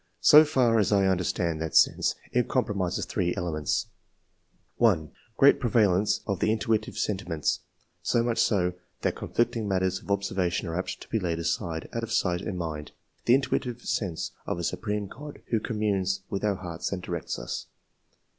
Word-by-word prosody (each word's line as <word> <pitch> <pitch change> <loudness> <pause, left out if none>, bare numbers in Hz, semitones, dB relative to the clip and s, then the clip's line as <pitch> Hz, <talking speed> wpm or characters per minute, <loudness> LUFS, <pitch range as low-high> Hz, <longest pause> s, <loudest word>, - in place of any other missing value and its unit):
So 150 +1 +9
far 125 -6 +3
as 105 -1 +2
I 100 -1 +4
understand 90 -3 0
that 80 -1 -3
sense, - - +4 0.2
it 125 0 +1
comprises 100 -8 0
three 90 -1 -1
elements: 75 -4 -1 0.5
— - - -42
1. 90 -11 +3 0.3
Great 140 - +6
prevalence 105 -5 +2
of 100 -3 -2
the 110 - +2
intuitive 110 -1 0
sentiments; 90 -6 -1 0.4
so 115 - +2
much 120 -1 0
so, 90 -4 +2 0.3
that - - 0
conflicting 120 -2 -1
matters 95 -1 0
of - - -18
observa 100 -3 0
tion 90 0 -2
are 80 - -3
apt 90 0 -3
to - - -10
be 110 - 0
laid 85 -4 -1
aside, 85 -1 -2
out 115 - -2
of 115 -1 -5
sight 90 -4 +1
and 90 - -4
mind. 80 -3 -5 0.3
The 120 - +6
intuitive 130 -2 -1
sense 90 -7 -2 0.2
of - - -1
a 85 - -4
supreme 105 +3 -2
God, 145 +9 -10
who 115 - +3
communes 100 -4 -1
with 100 - -2
our 105 -2 +2
hearts 85 -3 -5
and 100 - -2
directs 85 -2 -4
us. - - -5
100 Hz, 175 wpm, -27 LUFS, 90-115 Hz, 0.5 s, So